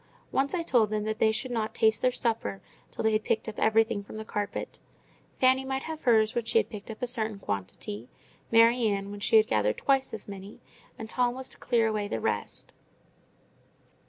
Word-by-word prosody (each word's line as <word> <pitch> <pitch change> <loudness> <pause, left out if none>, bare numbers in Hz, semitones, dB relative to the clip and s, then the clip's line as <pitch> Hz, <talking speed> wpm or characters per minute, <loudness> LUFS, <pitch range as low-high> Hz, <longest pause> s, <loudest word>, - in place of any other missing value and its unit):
Once 275 +5 +1
I 340 - -1
told 240 -9 +3
them 210 -1 -1
that 220 0 -3
they 220 - +4
should 250 +3 -3
not 220 -2 -2
taste 220 -2 +3
their 255 - +3
supper 220 - -2 0.3
till - - -5
they 220 - +3
had 215 0 +1
picked 220 - -1
up 220 - -6
everything 220 -1 +3
from 205 +2 -10
the 220 - -6
carpet; 205 -1 -4 0.5
Fanny 260 +1 +3
might 265 0 -3
have 320 -1 -6
hers 220 -2 +3
when 240 - -1
she 230 - +1
had - - +1
taken 210 +1 -7
up - - -9
a - - +1
certain 220 -4 -1
quantity, 100 - -5 0.4
Mary 230 +1 +5
Ann 200 -1 -2
when 205 - -7
she 225 +2 +4
had 215 - +6
gathered 105 - +1
twice 270 -1 +1
as 220 - -7
many, 200 0 -9 0.4
and 220 - -6
Tom 245 +1 0
was 260 0 -5
to - - -4
clear 235 -2 +2
away 210 -2 -1
the 115 - -3
rest. - - -3
220 Hz, 210 wpm, -28 LUFS, 205-245 Hz, 0.5 s, had